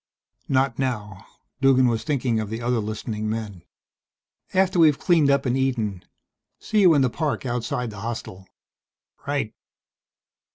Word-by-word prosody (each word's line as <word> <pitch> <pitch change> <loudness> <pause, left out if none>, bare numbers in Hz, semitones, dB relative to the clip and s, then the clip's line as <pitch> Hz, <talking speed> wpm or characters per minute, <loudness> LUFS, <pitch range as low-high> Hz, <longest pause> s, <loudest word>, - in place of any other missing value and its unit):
"Not 130 -2 +1
now." 105 -7 -3 0.3
Duggan 130 -1 +5
was 115 -2 0
thinking 130 -6 0
of 110 -2 -4
the 110 +1 -4
other 120 0 0
listening 110 0 -4
men. 105 -5 -4 0.9
"After 185 -1 +2
we've 155 -4 +5
cleaned 165 -6 +3
up 140 0 +2
and 125 0 +1
eaten. 115 -8 -1 0.5
See 215 -1 0
you 175 -5 +6
in 140 - +4
the 130 - +2
park 150 -2 -2
outside 120 -1 -2
the 105 - -9
hostel." 100 -4 -6 0.8
"Right." - - -1
125 Hz, 140 wpm, -24 LUFS, 110-140 Hz, 0.9 s, you